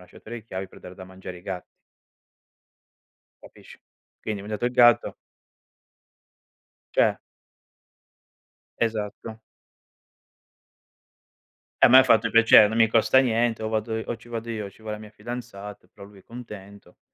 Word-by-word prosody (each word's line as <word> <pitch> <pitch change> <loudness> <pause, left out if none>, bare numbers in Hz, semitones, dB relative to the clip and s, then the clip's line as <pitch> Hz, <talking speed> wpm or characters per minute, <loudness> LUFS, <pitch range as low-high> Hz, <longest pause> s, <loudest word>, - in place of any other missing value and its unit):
lasciato 90 +4 -17
le 120 0 -7
chiavi 95 -3 -7
per - - -17
dare 90 - -11
da 95 - -11
mangiare 95 -1 -10
ai 90 - -15
ga 95 -2 -6 1.8
Capisci. - - -16 0.4
Quindi 105 -2 -5
mangiato 105 +3 -4
il - - -1
gatto 120 -1 +4 1.8
Cioè - - +3 1.6
Esatto. 110 0 -4 2.4
A - - +8
me 130 +2 +8
ha 130 - +7
fatto 115 -4 +3
piacere, 115 -2 +7
non 110 - -4
mi 115 -1 +5
costa 115 +4 +3
niente, 120 -3 +1
o - - -2
vado 110 0 -2
i - - -6
o - - -3
ci 115 +2 -18
vado 115 0 -6
io 110 -3 -4
o - - -10
ci 105 - -22
va 110 -1 -6
la 105 - -6
mia 105 -1 -12
fidanzata, 105 -2 -9
però 100 -1 -14
lui 100 -1 -17
è - - -24
contento. 100 -6 -12
110 Hz, 145 wpm, -24 LUFS, 100-115 Hz, 2.4 s, A